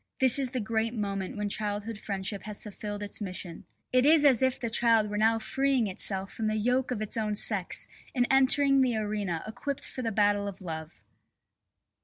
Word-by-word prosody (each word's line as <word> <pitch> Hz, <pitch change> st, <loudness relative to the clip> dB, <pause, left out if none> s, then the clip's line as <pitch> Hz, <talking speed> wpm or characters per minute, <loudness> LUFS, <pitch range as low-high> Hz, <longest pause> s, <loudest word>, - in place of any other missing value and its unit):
This 260 Hz, 0 st, +6 dB
is 265 Hz, -2 st, -1 dB
the 255 Hz, 0 st, -3 dB
great 225 Hz, +1 st, -2 dB
moment 195 Hz, -2 st, -4 dB
when 210 Hz, 0 st, -2 dB
childhood 210 Hz, +1 st, -4 dB
friendship 195 Hz, -1 st, -4 dB
has 210 Hz, -1 st, -5 dB
fulfilled 205 Hz, 0 st, -6 dB
its 205 Hz, +1 st, -6 dB
mission. 180 Hz, -3 st, -6 dB, 0.3 s
It 255 Hz, 0 st, +4 dB
is 300 Hz, +1 st, +5 dB
as 265 Hz, -4 st, +5 dB
if 260 Hz, -1 st, +1 dB
the 235 Hz, -, -3 dB
child 225 Hz, -2 st, +2 dB
were 210 Hz, -, -2 dB
now 225 Hz, +1 st, +3 dB
freeing 265 Hz, +2 st, 0 dB
itself 195 Hz, 0 st, +1 dB
from 220 Hz, -, -3 dB
the 215 Hz, 0 st, -1 dB
yoke 250 Hz, +4 st, 0 dB
of 225 Hz, -4 st, -3 dB
its 215 Hz, -, 0 dB
own 215 Hz, -1 st, -1 dB
sex 200 Hz, -3 st, +3 dB, 0.3 s
and 245 Hz, -1 st, +2 dB
entering 270 Hz, +1 st, +4 dB
the 250 Hz, -3 st, +1 dB
arena 205 Hz, -6 st, -3 dB
equipped 270 Hz, +6 st, -5 dB
for 255 Hz, -, -7 dB
the 230 Hz, -2 st, -2 dB
battle 205 Hz, -1 st, +1 dB
of 200 Hz, -, -7 dB
love. 160 Hz, -3 st, -8 dB
215 Hz, 195 wpm, -28 LUFS, 205-250 Hz, 0.3 s, This